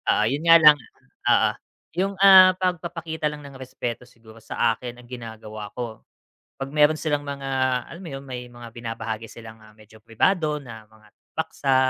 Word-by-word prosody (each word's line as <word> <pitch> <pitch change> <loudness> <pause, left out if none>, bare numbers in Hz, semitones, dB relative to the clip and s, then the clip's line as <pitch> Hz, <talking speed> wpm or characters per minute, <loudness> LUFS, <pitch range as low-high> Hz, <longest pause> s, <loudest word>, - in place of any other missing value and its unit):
Oo, 105 - +2
yun 135 +6 0
nga 165 - +9
lang. 150 -2 +8 0.6
Oo, - - +3 0.5
'yung, 195 +1 0
ah, 185 -1 +9
pagpapakita 170 -3 -3
lang 150 -1 -6
ng 135 -2 -11
respeto 125 -1 -6
siguro 115 -2 -17
sa 115 +1 0
akin, 120 -1 -8
ang 120 - -19
ginagawa 110 -3 -8
ko, 120 -3 -5 0.6
'pag 135 - -3
meron 150 +1 +4
silang 145 -2 -1
mga 140 -1 -5 0.4
alam 170 +3 -10
mo 165 - -7
yun, 135 0 -6
may 125 -2 -6
mga 120 -1 -10
binabahagi 115 -1 -6
silang, 110 -1 -12
ah, 110 - -17
medyo 110 0 -19
pribado 150 - +1
na 115 -5 -11
mga 110 -1 -21 0.2
paksa 145 -4 0
130 Hz, 170 wpm, -24 LUFS, 115-155 Hz, 0.6 s, nga